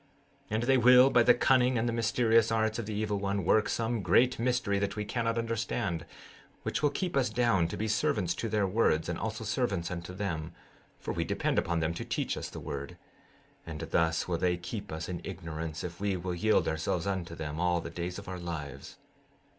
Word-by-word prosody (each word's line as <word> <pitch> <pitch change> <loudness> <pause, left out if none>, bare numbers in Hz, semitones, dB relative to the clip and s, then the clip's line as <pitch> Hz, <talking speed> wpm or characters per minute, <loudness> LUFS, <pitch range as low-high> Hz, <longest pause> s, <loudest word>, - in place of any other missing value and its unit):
16:21 - - -7
And 110 - 0
they 130 +2 +4
will, 125 +2 +7
by 120 - +5
the 120 +1 +6
cunning 130 -1 +3
and 115 +1 +1
the 115 - 0
mysterious 115 -1 +3
arts 110 0 +1
of 110 - -4
the 110 - -3
evil 105 -1 -1
one, 100 -2 -1
work 110 +3 +3
some 115 -1 -1
great 125 +6 +3
mystery 120 -5 +1
which 100 0 -1
we 105 0 -3
cannot 115 +1 -1
understand, 110 -7 -2 0.6
which - - -2
will 150 - +4
keep 180 +2 -3
us 130 -3 +2
down 110 -7 +2
to - - -5
be 110 - -1
servants 100 -3 +1
to 115 - -3
their 105 -1 +1
words, 95 -5 +2
and 85 -1 -3
also 110 0 -3
servants 105 -6 -1
unto 85 0 -5
them, 85 -4 -4 0.4
for - - -4
we - - -1
depend - - 0
upon 85 -1 -1
them 80 +1 0
to - - -5
teach - - -2
us - - -5
the - - -8
word; 70 0 -6 0.7
and 80 -2 -7
thus 80 -1 +2
will 85 -2 -1
they 90 0 +1
keep 100 +4 -6
us 80 0 -4
in 85 -2 -4
ignorance 80 -2 -5
if 85 0 -6
we 100 -2 0
will 90 0 -3
yield 105 +5 +2
ourselves 80 +2 -1
unto 95 -4 -3
them, 75 -1 -5
all 90 0 +2
the - - -7
days 90 +1 -4
of 100 - -9
our 90 -1 -5
lives. 80 -5 -6
100 Hz, 215 wpm, -30 LUFS, 85-115 Hz, 0.7 s, will